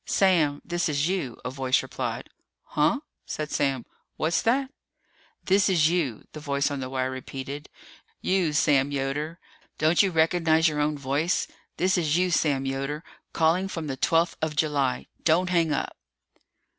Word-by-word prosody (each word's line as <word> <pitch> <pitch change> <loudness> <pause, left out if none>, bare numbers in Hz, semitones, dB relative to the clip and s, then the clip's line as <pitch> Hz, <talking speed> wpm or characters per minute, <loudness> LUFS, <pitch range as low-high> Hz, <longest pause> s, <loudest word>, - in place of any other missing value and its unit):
"Sam, 165 -7 +2
this 175 -1 -1
is 145 +1 +1
you," 175 -10 -2
a 125 - -2
voice 130 -1 +1
replied. - - -4 0.4
"Huh?" 195 - +1 0.3
said 150 -1 -4
Sam. 135 -4 0 0.3
"What's 160 +2 +1
that?" 265 +4 +1 0.7
"This 195 +1 +3
is 160 -4 +4
you," 160 -10 -1
the 155 - -8
voice 140 -1 0
on 140 - -3
the 130 -1 -4
wire 130 0 -1
repeated. 135 +2 -7 0.5
"You, 185 -4 +1
Sam 145 -2 +3
Yoder. 145 +4 -2 0.4
Don't 160 +2 +4
you 200 - +3
recognize 160 -1 +3
your 150 -1 -1
own 150 0 +1
voice? 140 +5 0 0.3
This 185 0 +2
is 155 -1 +1
you, 180 0 +2
Sam 140 -5 +1
Yoder, 135 +3 -3 0.3
calling 165 +4 +2
from 165 -4 -5
the 135 -3 -3
twelfth 165 +5 +2
of 155 -1 -1
July. 145 -4 0 0.2
Don't 180 +3 +3
hang 165 -3 +2
up!" 145 - -2
155 Hz, 155 wpm, -26 LUFS, 140-170 Hz, 0.7 s, is